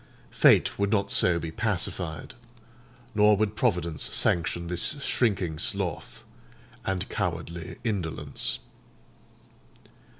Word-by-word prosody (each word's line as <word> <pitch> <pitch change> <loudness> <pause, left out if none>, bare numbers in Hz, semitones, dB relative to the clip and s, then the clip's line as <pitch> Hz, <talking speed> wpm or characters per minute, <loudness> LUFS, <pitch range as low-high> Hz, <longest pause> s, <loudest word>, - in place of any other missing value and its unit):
Fate - - +4
would 100 0 +1
not 100 -2 +1
so 85 -1 +4
be 80 -1 -5
pacified; 90 -5 -3 0.8
nor 105 -1 +4
would 110 0 -1
Providence 90 -10 0
sanction 85 0 +1
this 90 - +2
shrinking 95 -9 0
sloth - - -1 0.6
and 95 +1 -2
cowardly 85 -3 -4
indolence. 90 - -1
90 Hz, 95 wpm, -27 LUFS, 85-105 Hz, 0.8 s, Fate